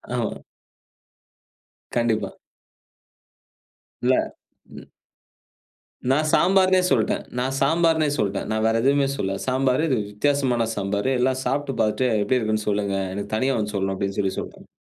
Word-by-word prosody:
ஆமா. -, -, -3 dB, 1.5 s
கண்டிப்பா. 115 Hz, -4 st, 0 dB, 1.7 s
இல்ல. -, -, +3 dB, 0.6 s
ம். -, -, -12 dB, 1.2 s
நான் 155 Hz, +3 st, +2 dB
"சாம்பார்னே" 185 Hz, 0 st, +4 dB
சொல்ட்டேன். 115 Hz, -5 st, +1 dB, 0.2 s
நான் 130 Hz, +2 st, -1 dB
"சாம்பார்னே" 160 Hz, +1 st, +2 dB
சொல்ட்டேன். 100 Hz, -1 st, -1 dB
நான் 110 Hz, 0 st, 0 dB
வேறு 115 Hz, 0 st, +2 dB
எதுவுமே 140 Hz, +1 st, +3 dB
சொல்லல. 95 Hz, 0 st, -2 dB
"சாம்பார் 130 Hz, +3 st, +1 dB
இது 130 Hz, -, +1 dB
வித்தியாசமான 125 Hz, 0 st, +1 dB
சாம்பார், 100 Hz, +4 st, -1 dB
எல்லாம் 130 Hz, +1 st, +1 dB
சாப்பிட்டு 135 Hz, 0 st, -1 dB
பார்த்துட்டு 115 Hz, +3 st, +1 dB
எப்டி 125 Hz, +4 st, +1 dB
இருக்குன்னு 110 Hz, -1 st, -1 dB
சொல்லுங்க. 100 Hz, -1 st, 0 dB, 0.2 s
எனக்கு 100 Hz, +1 st, -5 dB
தனியா 130 Hz, +2 st, +1 dB
வந்து 105 Hz, -1 st, -3 dB
சொல்லணும்" 95 Hz, 0 st, -1 dB
அப்டின்னு 100 Hz, 0 st, -3 dB
சொல்லி 95 Hz, -1 st, -2 dB
சொல்ட்டேன். -, -, -9 dB
125 Hz, 125 wpm, -23 LUFS, 105-135 Hz, 1.7 s, சாம்பார்னே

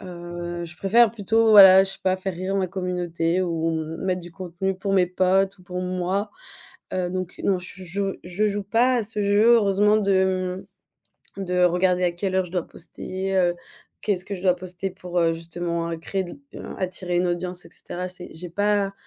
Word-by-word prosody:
Heu, 175 Hz, -1 st, -6 dB
je 170 Hz, +1 st, -11 dB
préfère 220 Hz, +3 st, +4 dB
plutôt, 225 Hz, +1 st, +2 dB
voilà, 190 Hz, -2 st, +10 dB
je 195 Hz, -, -2 dB
sais -, -, -10 dB
pas, 185 Hz, 0 st, +2 dB
faire 190 Hz, 0 st, -4 dB
rire 185 Hz, +3 st, -3 dB
ma 190 Hz, -2 st, 0 dB
communauté 180 Hz, -1 st, -1 dB
ou 165 Hz, -2 st, -1 dB, 0.3 s
mettre 185 Hz, -1 st, -1 dB
du 175 Hz, 0 st, -11 dB
contenu 185 Hz, +1 st, -3 dB
pour 195 Hz, 0 st, -2 dB
mes 185 Hz, -2 st, +4 dB
potes 190 Hz, +2 st, +1 dB
ou -, -, -17 dB
pour 180 Hz, 0 st, -5 dB
moi. 185 Hz, +3 st, -2 dB, 0.6 s
Heu, 180 Hz, -1 st, -1 dB
donc 185 Hz, -1 st, -5 dB
non, 190 Hz, -2 st, +2 dB
je 185 Hz, +1 st, -10 dB
joue 195 Hz, +2 st, -2 dB
je 185 Hz, +4 st, 0 dB
joue 205 Hz, 0 st, -2 dB
pas 235 Hz, +6 st, +3 dB
à 235 Hz, -, +1 dB
ce 210 Hz, 0 st, -4 dB
jeu, 210 Hz, +4 st, +5 dB
heureusement 210 Hz, -1 st, +4 dB
de, 200 Hz, -2 st, +1 dB, 1.3 s
hem, 195 Hz, -, -4 dB
de 180 Hz, 0 st, 0 dB
regarder 180 Hz, +1 st, +2 dB
à 175 Hz, -, +1 dB
quelle 185 Hz, +2 st, -3 dB
heure 190 Hz, -1 st, +2 dB
je 175 Hz, -, -13 dB
dois 180 Hz, -3 st, -1 dB
poster, 190 Hz, +3 st, -5 dB
heu, 175 Hz, -2 st, +3 dB, 0.5 s
qu'est-ce 195 Hz, -4 st, 0 dB
que 200 Hz, -, -4 dB
je 180 Hz, -, -9 dB
dois 180 Hz, -2 st, +4 dB
poster 180 Hz, +1 st, -6 dB
pour, 180 Hz, -1 st, -3 dB
heu, 165 Hz, -1 st, +3 dB
justement, 170 Hz, 0 st, -4 dB
heu, 165 Hz, -, -3 dB
créer 190 Hz, +4 st, -3 dB
de 175 Hz, -, -10 dB
la -, -, -8 dB
attirer 180 Hz, -1 st, -2 dB
une 180 Hz, 0 st, +2 dB
audience, 175 Hz, +1 st, -3 dB
et 165 Hz, -, -13 dB
cetera. 180 Hz, +1 st, -6 dB
C'est 180 Hz, -1 st, -9 dB
j'ai 175 Hz, +2 st, -8 dB
pas 205 Hz, +2 st, +1 dB
185 Hz, 205 wpm, -24 LUFS, 175-195 Hz, 1.3 s, voilà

